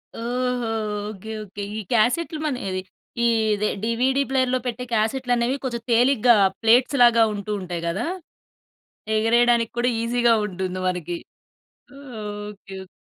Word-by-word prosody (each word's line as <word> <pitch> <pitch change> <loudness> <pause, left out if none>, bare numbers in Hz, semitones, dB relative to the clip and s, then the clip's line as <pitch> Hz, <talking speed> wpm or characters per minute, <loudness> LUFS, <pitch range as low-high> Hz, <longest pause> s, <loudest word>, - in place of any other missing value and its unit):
ఓహో! 245 +1 -2 0.4
Okay. 215 +1 -8
Okay. 200 0 -8
ఈ - - -2
క్యాసెట్‌లు 255 +8 +1
మన 295 -4 0
ఇదే 185 0 -2 0.4
ఈదే 220 -2 +2
డీవీడీ 250 +4 +1
ప్లేయర్‌లో 260 -1 +1
పెట్టే 245 0 -3
క్యాసెట్‌లనేవి 245 +2 +1
కొంచెం 240 -3 -3
తేలిగ్గా 245 0 +5 0.3
ప్లేట్స్‌లాగా 240 0 +5
ఉంటూ 205 0 -5
ఉంటాయి 175 -2 -5
గదా! 190 +8 -2 1.1
ఎగరేయడానికి 235 +1 +3
కూడా 245 +1 +2
ఈజీ‌గా 235 0 +3
ఉంటుంది 185 -1 -4
మనకి. 175 -1 -3 1.3
ఓకే. 200 -1 -12
ఓకే. - - -17
230 Hz, 115 wpm, -23 LUFS, 210-245 Hz, 1.3 s, తేలిగ్గా